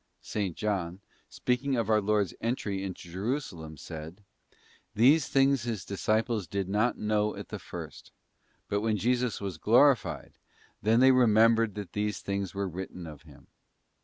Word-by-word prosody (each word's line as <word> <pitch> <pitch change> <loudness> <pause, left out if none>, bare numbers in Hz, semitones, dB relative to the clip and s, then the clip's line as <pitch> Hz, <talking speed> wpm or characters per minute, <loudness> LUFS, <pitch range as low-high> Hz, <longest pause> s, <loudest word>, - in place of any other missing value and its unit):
'* - - -42
§S. 100 -6 -3
John, 95 -4 -2 0.3
speaking 130 +2 -1
of 115 -3 0
our 110 -1 +3
Lord's 105 -2 +1
entry 105 -5 -2
into 95 -2 -7
Jerusalem, 90 - -4
says: 80 +2 -8 0.8
'These 135 +7 +5
things 135 -1 +3
His 110 -6 -4
disciples 110 +1 0
did 100 -2 -2
not 105 +5 +1
know 105 0 0
at - - -8
the - - -5
first; - - -9 0.6
but 100 0 -1
when 110 -1 +1
Jesus 125 +2 0
was 95 -5 -5
glorified, 125 - +3 0.4
then 115 +3 +3
they 130 0 +7
remembered 115 -3 +4
that 105 -3 -7
these 105 -2 -1
things 100 -2 -3
were 100 0 -1
written 90 0 -7
of 75 -3 -10
Him. 75 -3 -17
105 Hz, 155 wpm, -29 LUFS, 95-115 Hz, 0.8 s, they